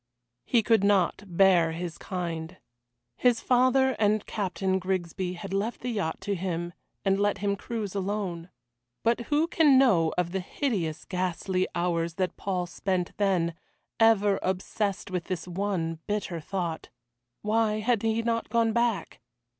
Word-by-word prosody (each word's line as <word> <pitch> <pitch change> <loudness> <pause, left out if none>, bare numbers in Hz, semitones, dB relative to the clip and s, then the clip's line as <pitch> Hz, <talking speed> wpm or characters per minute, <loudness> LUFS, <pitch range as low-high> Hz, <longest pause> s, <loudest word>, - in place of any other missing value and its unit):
He 235 -3 +3
could 225 -2 +3
not 200 -1 +2
bear 175 -2 +4
his 170 0 -5
kind. 170 -1 -4 0.6
His 245 -2 +3
father 255 +1 +3
and 210 0 +2
Captain 190 -2 -1
Grigsby 185 0 -2
had 185 +2 -7
left 205 +4 -1
the 250 - -2
yacht 195 -8 -2
to 205 - -2
him 175 -2 -3 0.3
and 195 0 +3
let 205 0 +2
him 200 0 0
cruise 210 -1 -4
alone. 190 -3 -3 0.5
But 230 +1 +2
who 300 +2 +3
can 305 -5 +5
know 190 -12 +4
of 175 -1 0
the 190 - -1
hideous, 180 - -2
ghastly 185 0 -1
hours 170 -1 0
that 185 0 -1
Paul 185 -2 -2
spent 180 0 -2
then, 185 -4 +1 0.5
ever 210 -3 +4
obsessed 190 +1 -2
with 180 -2 -2
this 185 -2 -4
one 175 -3 -2
bitter 205 -5 -2
thought? 170 -1 -4 0.5
Why 215 0 +2
had 230 -1 +1
he 225 0 0
not 230 0 -1
gone 225 0 +2
back? 235 -2 0
195 Hz, 145 wpm, -27 LUFS, 175-220 Hz, 0.6 s, can